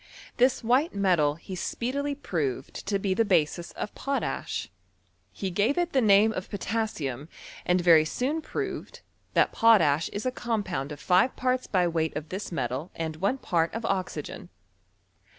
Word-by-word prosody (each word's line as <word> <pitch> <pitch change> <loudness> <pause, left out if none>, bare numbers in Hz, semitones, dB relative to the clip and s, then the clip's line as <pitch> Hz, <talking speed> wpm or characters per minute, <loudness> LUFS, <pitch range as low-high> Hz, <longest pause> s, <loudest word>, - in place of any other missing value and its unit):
Thia 250 +2 +6
white 255 +6 +2
metal 175 -7 +2
he 185 +3 -8
speedily 280 +9 -2
proved 145 - -3
to 200 0 +1
be 195 -1 0
tlie 225 +3 +1
basis 170 -2 +1
o€ - - -4
potash. 275 0 -3 0.6
He 190 -2 -4
gave 210 - +1
it 350 -1 0
the 265 - +4
name 215 0 +5
of 185 - -5
potassium, 180 - -3 0.4
and 180 +1 +3
very 165 -3 +7
soon 275 - -1
proved, - - -5 0.3
that - - +4
potash 165 -10 +4
is 205 +5 -5
a 255 - +1
compound 200 - -2
of 145 - -7
five 185 +10 +3
parts 255 0 0
by 180 -3 +2
weight 160 -2 -1
of 150 0 -5
this 190 +1 -5
metal 135 +2 -3
and 160 -1 -4
one 200 +10 0
part 170 -6 0
of 230 0 -3
oxygen. 180 - -3
190 Hz, 160 wpm, -27 LUFS, 160-230 Hz, 0.6 s, very